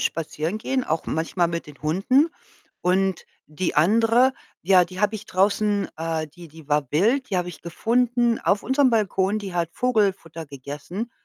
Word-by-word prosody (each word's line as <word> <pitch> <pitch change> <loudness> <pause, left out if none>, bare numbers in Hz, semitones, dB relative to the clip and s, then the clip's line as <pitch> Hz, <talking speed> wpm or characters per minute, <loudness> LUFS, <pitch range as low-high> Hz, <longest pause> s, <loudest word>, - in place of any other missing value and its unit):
spazieren 165 +4 -2
gehen, 260 +3 -1
auch 160 - -2
manchmal 165 +2 0
mit 170 0 -4
den 150 -1 -14
Hunden. 195 - +2 0.5
Und 190 0 +1 0.2
die 160 +4 -3
andere, 230 - +4 0.3
ja, 180 0 +5
die 185 +2 -9
habe 210 +1 +2
ich 215 0 -7
draußen 200 +1 +1
äh, 160 0 -2
die 170 +3 -13
die 155 -1 -15
war 145 -3 0
wild, 230 - +2
die 190 - 0
habe 180 0 -1
ich 165 -5 -10
gefunden 240 +6 +1
auf 200 0 +1
unserem 265 0 +3
Balkon, 205 -2 +1
die 200 -3 -6
hat 170 -2 0
Vogelfutter 195 -9 0
gegessen 145 - -7
185 Hz, 165 wpm, -23 LUFS, 165-220 Hz, 0.5 s, ja